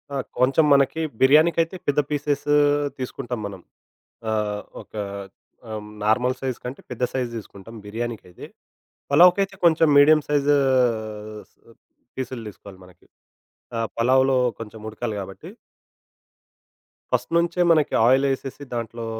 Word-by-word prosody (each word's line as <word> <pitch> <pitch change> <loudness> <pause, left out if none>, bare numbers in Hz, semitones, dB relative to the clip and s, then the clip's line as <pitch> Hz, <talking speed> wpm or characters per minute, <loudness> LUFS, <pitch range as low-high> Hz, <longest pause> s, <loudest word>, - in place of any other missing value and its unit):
ఆ! - - -1 0.2
కొంచెం 135 +5 +4
మనకి 140 +3 +2 0.2
బిర్యానీకైతే, 165 +5 +4
పెద్ద 145 +1 +2
పీసెస్సు 145 0 -1 0.5
దీసుకుంటాం 125 -1 -5
మనం. 95 -3 -10 0.7
ఆహ్, 105 -1 -1 0.2
ఒక - - -35 0.8
ఆమ్, 105 -1 -6
నార్మల్ 125 +4 +2
సైజ్ 130 -2 -3
కంటే, 125 +3 -6
పెద్ద 125 0 -4
సైజ్ 125 -2 -1
దీసుకుంటాం 105 +1 -11
బిర్యానీకైతే. 110 -4 -6 0.7
పలావ్‍కైతే 180 +6 +5
కొంచెం 165 -1 +5
మీడియం 155 +2 +7
సైజ్ 145 -1 +1
ఆహ్, 110 -5 -1 0.7
పీసులు 130 -2 -5
దీసుకోవాలి 100 -2 -13
మనకి. 90 -1 -20 0.7
ఆ! 115 - -1 0.2
పలావ్‍లో 130 +2 +3 0.2
కొంచెం 110 -1 -9
ఉడకాలి 110 0 -4
గాబట్టి. 95 - -9 1.6
ఫస్ట్ - - 0
నుంచే 175 +1 +1
మనకి 155 -3 +2
ఆయిలేసేసి, 135 +1 +1
దాంట్లో 115 0 -5
130 Hz, 115 wpm, -23 LUFS, 110-145 Hz, 1.6 s, మీడియం